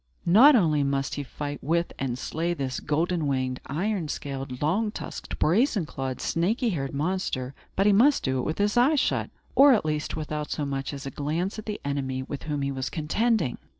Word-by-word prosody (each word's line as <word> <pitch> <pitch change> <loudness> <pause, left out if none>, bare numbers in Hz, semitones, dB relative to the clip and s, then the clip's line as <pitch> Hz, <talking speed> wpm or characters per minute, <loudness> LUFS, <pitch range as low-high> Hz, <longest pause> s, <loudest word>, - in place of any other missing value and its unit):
Not 240 - +8
only 155 -9 +3
must 140 -1 0
he 145 - -3
fight 145 +2 -6
with 170 +4 0
and 125 -2 -2
slay 170 +6 -2
this 135 -4 -3
golden 160 +1 0
winged, 130 -2 -1
iron 180 +3 -1
scaled, 135 -3 -5
long 195 +9 +1
tusked, 210 - -7
brazen 200 - +2
clawed, 135 -3 -4
snaky 220 +9 0
haired 135 -6 -3
monster, 145 -5 -2 0.2
but 195 - +2
he 205 - +5
must 265 +8 +4
do 130 -1 0
it - - -2
with 155 - -2
his 205 +2 +1
eyes 275 +5 +5
shut, - - 0 0.2
or, 275 0 +7
at 205 - -1
least, 150 -1 -2
without 150 -1 -4
so 150 - -2
much 135 -1 -3
as 140 -1 -7
a 135 - -4
glance 165 - -2
at 215 - -10
the 210 - -3
enemy 135 -2 -2
with 140 +1 -6
whom 145 -1 -1
he 140 - -1
was 135 -1 -3
contending. 175 - 0
150 Hz, 200 wpm, -26 LUFS, 140-195 Hz, 0.2 s, Not